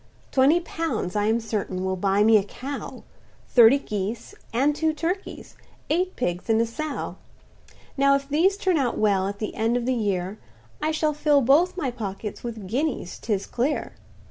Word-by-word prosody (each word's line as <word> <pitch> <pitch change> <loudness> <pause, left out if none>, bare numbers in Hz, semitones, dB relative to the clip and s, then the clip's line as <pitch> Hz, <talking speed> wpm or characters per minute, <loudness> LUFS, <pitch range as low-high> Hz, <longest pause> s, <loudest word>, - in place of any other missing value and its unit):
"Twenty 280 +6 +4
pounds, 325 - -3
I 205 0 +1
am 225 +2 +2
certain, 205 -4 -3
will 190 0 0
buy 195 +2 +2
me 220 +1 +6
a 200 - +1
cow, 270 +7 -7 0.5
Thirty 240 +2 +7
geese, 215 - -4 0.2
and 275 +5 +2
two 315 +1 +1
turkeys—eight 360 +1 -4
pigs 175 -3 -3
and 220 0 +4
a 230 - +3
sow; 295 +6 -5 0.8
Now 275 0 +4
if 275 0 -2
these 340 +8 +2
turn 375 -4 +1
out 250 -4 0
well, 195 -3 +2
at 200 0 -4
the 215 0 -4
end 225 +2 +1
of 240 - -3
the 260 - +1
year, 200 -3 -2 0.4
I 310 - +1
shall 310 -1 +1
fill 295 -1 +3
both 315 +9 +3
my 280 -8 -1
pockets 210 -3 -6
with 225 -4 -6
guineas 250 - -2
'tis 200 -4 -2
clear. 270 +5 -2
240 Hz, 170 wpm, -25 LUFS, 210-300 Hz, 0.8 s, Thirty